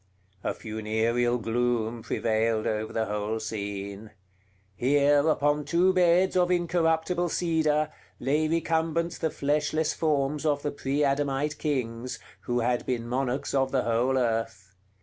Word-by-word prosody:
A -, -, -1 dB
funereal 110 Hz, +2 st, 0 dB
gloom 115 Hz, 0 st, -1 dB
prevailed 110 Hz, 0 st, 0 dB
over 110 Hz, 0 st, -2 dB
the 110 Hz, -1 st, -1 dB
whole 105 Hz, +1 st, -2 dB
scene. 100 Hz, -1 st, -5 dB, 0.7 s
Here, 145 Hz, +5 st, +3 dB
upon 145 Hz, -1 st, +2 dB
two 175 Hz, +4 st, +3 dB
beds 180 Hz, +1 st, +3 dB
of 180 Hz, -1 st, +3 dB
incorruptible 175 Hz, 0 st, +1 dB
cedar, 155 Hz, -3 st, +1 dB, 0.3 s
lay 150 Hz, +5 st, +1 dB
recumbent 165 Hz, +1 st, 0 dB
the 160 Hz, -, 0 dB
fleshless 150 Hz, +2 st, 0 dB
forms 150 Hz, -2 st, 0 dB
of 145 Hz, -2 st, 0 dB
the 145 Hz, -, -1 dB
pre 140 Hz, +1 st, -1 dB
Adamite 140 Hz, +1 st, 0 dB
kings, 125 Hz, -4 st, -2 dB, 0.3 s
who 120 Hz, 0 st, 0 dB
had 120 Hz, +1 st, 0 dB
been 120 Hz, -2 st, -2 dB
monarchs 130 Hz, +2 st, -2 dB
of 135 Hz, -1 st, +1 dB
the 130 Hz, -2 st, +1 dB
whole 120 Hz, +3 st, +1 dB
earth. 110 Hz, -6 st, -2 dB
135 Hz, 130 wpm, -27 LUFS, 115-155 Hz, 0.7 s, Here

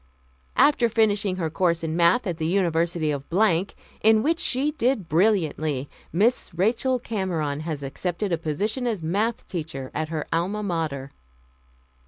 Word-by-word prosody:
"After 255 Hz, -5 st, +4 dB
finishing 205 Hz, -4 st, +2 dB
her 165 Hz, -4 st, -2 dB
course 170 Hz, 0 st, +1 dB
in 160 Hz, 0 st, -2 dB
Math. 170 Hz, +8 st, +4 dB
at 175 Hz, -4 st, -3 dB
the 160 Hz, -, 0 dB
University 170 Hz, -3 st, +1 dB
of 140 Hz, -2 st, -3 dB, 0.8 s
in 220 Hz, 0 st, +5 dB
which 330 Hz, +3 st, +1 dB
she 275 Hz, +4 st, +2 dB
did 255 Hz, -, 0 dB
brilliantly, 155 Hz, -6 st, +1 dB, 0.2 s
Miss 215 Hz, +8 st, +1 dB
Rachel 235 Hz, +8 st, +1 dB
Cameron 180 Hz, -11 st, -2 dB
has 155 Hz, -2 st, -4 dB
accepted 180 Hz, +8 st, -3 dB
a 170 Hz, -, +2 dB
position 210 Hz, -, -2 dB
as 210 Hz, -8 st, -2 dB
Math. 205 Hz, +8 st, -1 dB
teacher 150 Hz, -7 st, -5 dB
at 155 Hz, 0 st, -2 dB
her 155 Hz, -2 st, -3 dB
Alma 190 Hz, +6 st, -1 dB
Mater." 155 Hz, -7 st, -3 dB
175 Hz, 145 wpm, -24 LUFS, 160-220 Hz, 0.8 s, in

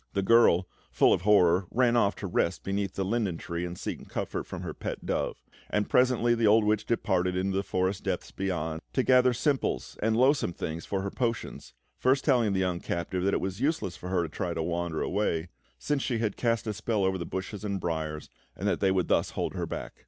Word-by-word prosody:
The 100 Hz, -, 0 dB
girl, 95 Hz, -4 st, +5 dB, 0.2 s
full -, -, +4 dB
of -, -, 0 dB
horror, 90 Hz, -3 st, +4 dB
ran 120 Hz, -1 st, +2 dB
off 100 Hz, -4 st, +3 dB
to -, -, -6 dB
rest 85 Hz, -2 st, 0 dB
beneath 100 Hz, -1 st, -2 dB
the 95 Hz, -, -1 dB
linden 100 Hz, -4 st, 0 dB
tree 85 Hz, +1 st, -4 dB
and 90 Hz, 0 st, -7 dB
seek -, -, -6 dB
comfort -, -, -3 dB
from -, -, -6 dB
her -, -, -4 dB
pet -, -, -6 dB
dove; -, -, -2 dB, 0.3 s
and 105 Hz, 0 st, 0 dB
presently, 125 Hz, -2 st, +4 dB
the 115 Hz, -2 st, +2 dB
old 110 Hz, +1 st, +5 dB
witch 105 Hz, 0 st, +1 dB
departed 90 Hz, -5 st, +1 dB
into 95 Hz, +1 st, 0 dB
the 100 Hz, -, +2 dB
forest 95 Hz, 0 st, -1 dB
depths -, -, -3 dB
beyond, 85 Hz, -4 st, -3 dB
to 130 Hz, -, +2 dB
gather 125 Hz, 0 st, +5 dB
simples 130 Hz, +3 st, -1 dB
and 110 Hz, +1 st, +2 dB
loathsome 130 Hz, -, +3 dB
things 80 Hz, 0 st, -5 dB
for 95 Hz, -1 st, -1 dB
her 100 Hz, -, -3 dB
potions, 115 Hz, -, -3 dB, 0.2 s
first 130 Hz, +2 st, +2 dB
telling 120 Hz, -8 st, +3 dB
the 95 Hz, -, +1 dB
young 90 Hz, -2 st, 0 dB
captive 90 Hz, +1 st, -3 dB
that 100 Hz, -, +2 dB
it -, -, -1 dB
was 95 Hz, 0 st, -4 dB
useless 140 Hz, -, 0 dB
for 90 Hz, -, -8 dB
her 90 Hz, -2 st, +1 dB
to 80 Hz, -, -4 dB
try 85 Hz, +2 st, -3 dB
to 80 Hz, -, -1 dB
wander 85 Hz, -1 st, -2 dB
away, 90 Hz, -4 st, -1 dB, 0.3 s
since 145 Hz, -2 st, -1 dB
she 125 Hz, -3 st, -1 dB
had 110 Hz, -3 st, -1 dB
cast 115 Hz, -2 st, 0 dB
a 110 Hz, -, -2 dB
spell 105 Hz, 0 st, -1 dB
over 95 Hz, 0 st, 0 dB
the -, -, -2 dB
bushes 95 Hz, +2 st, -5 dB
and 100 Hz, -2 st, -2 dB
briars, 80 Hz, -3 st, -3 dB, 0.3 s
and -, -, -3 dB
that -, -, +1 dB
they 95 Hz, -, +3 dB
would 95 Hz, -2 st, +1 dB
thus -, -, +2 dB
hold -, -, -3 dB
her -, -, -3 dB
back. -, -, -6 dB
100 Hz, 225 wpm, -28 LUFS, 90-115 Hz, 0.3 s, girl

